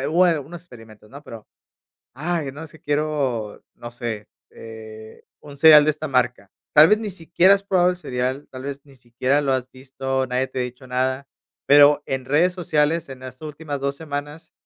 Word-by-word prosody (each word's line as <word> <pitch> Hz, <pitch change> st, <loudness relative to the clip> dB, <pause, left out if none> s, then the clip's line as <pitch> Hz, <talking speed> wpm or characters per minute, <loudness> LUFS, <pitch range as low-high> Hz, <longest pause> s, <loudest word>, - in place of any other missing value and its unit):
algunos 165 Hz, 0 st, +1 dB
experimentos, 115 Hz, -9 st, -16 dB
¿no? 140 Hz, +3 st, -12 dB
Pero, 115 Hz, -7 st, -11 dB, 0.7 s
ay, 155 Hz, +1 st, -3 dB
no 150 Hz, +4 st, -9 dB
es 155 Hz, -, -13 dB
que 160 Hz, -, -17 dB
quiero 145 Hz, -7 st, -2 dB
no 120 Hz, -, -9 dB
sé, 115 Hz, -3 st, -6 dB, 0.2 s
eh, 110 Hz, -1 st, -12 dB, 0.2 s
un 145 Hz, -1 st, -12 dB
cereal 150 Hz, 0 st, +8 dB
de 155 Hz, -, +3 dB
esta 155 Hz, +1 st, -5 dB
marca, 125 Hz, -6 st, 0 dB, 0.2 s
tal 155 Hz, +1 st, +8 dB
vez, 210 Hz, -, +4 dB
ni 215 Hz, -2 st, -4 dB
siquiera 180 Hz, +2 st, +3 dB
has 200 Hz, -, -3 dB
probado 180 Hz, -2 st, +3 dB
el 180 Hz, -, -4 dB
cereal, 130 Hz, -3 st, -3 dB
tal 130 Hz, 0 st, -9 dB
vez 140 Hz, 0 st, -6 dB
ni 140 Hz, -2 st, -19 dB
siquiera 130 Hz, +3 st, -1 dB
lo 140 Hz, -2 st, 0 dB
has 130 Hz, -1 st, -2 dB
visto, 135 Hz, 0 st, -4 dB
nadie 130 Hz, +1 st, -1 dB
te 130 Hz, -, -5 dB
ha -, -, +1 dB
dicho 125 Hz, +2 st, -8 dB
nada, 130 Hz, +2 st, -2 dB, 0.4 s
pero, 145 Hz, +1 st, +6 dB
en 135 Hz, -1 st, -3 dB
redes 155 Hz, +7 st, +2 dB
sociales 165 Hz, -2 st, 0 dB
en 135 Hz, -1 st, -9 dB
las 130 Hz, 0 st, -10 dB
últimas 150 Hz, -1 st, -6 dB
dos 140 Hz, 0 st, -2 dB
semanas 145 Hz, 0 st, -7 dB
140 Hz, 190 wpm, -22 LUFS, 125-155 Hz, 0.7 s, cereal